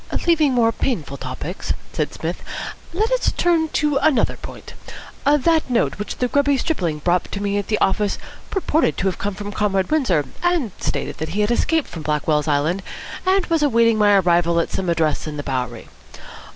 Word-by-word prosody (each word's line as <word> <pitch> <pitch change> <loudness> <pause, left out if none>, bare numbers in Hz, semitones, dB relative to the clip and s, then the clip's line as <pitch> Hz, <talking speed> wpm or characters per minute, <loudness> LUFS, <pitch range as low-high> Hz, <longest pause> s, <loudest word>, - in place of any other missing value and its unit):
"Leaving 320 -5 +4
more 235 -2 +3
painful 170 - -2
topics," 135 +7 -4 0.2
said - - -1
Psmith, - - -4 0.5
"let 430 +7 0
us - - +2
turn 335 -2 +2
to 300 -2 +1
another 295 -3 +2
point. - - -10 0.5
That 295 +2 +3
note 235 -4 +1
which 205 - -4
the 250 - +1
grubby 285 +1 +2
stripling 185 - -1
brought 180 0 +1
to 200 - -3
me 200 0 0
at 200 - -5
the 215 - +1
office 205 +1 +1 0.3
purported 330 -5 +1
to 190 +1 +1
come 200 +2 -4
from 205 +1 -6
Comrade 195 0 0
Windsor, 260 - +2 0.2
and 350 - +1
stated - - -3
that 160 +1 -3
he - - +3
had 210 +2 +1
escaped 320 +5 +1
from 165 - -8
Blackwell's 150 0 0
Island, 155 +6 +1 0.5
and 380 -1 +3
was 330 -2 +1
awaiting 230 -5 +3
my 205 -1 +5
arrival 170 -2 +3
at 170 - -1
some 185 -2 -2
address 160 -2 0
in 150 -1 -5
the 145 - -4
Bowery. 125 -4 -3
205 Hz, 180 wpm, -21 LUFS, -, 0.5 s, my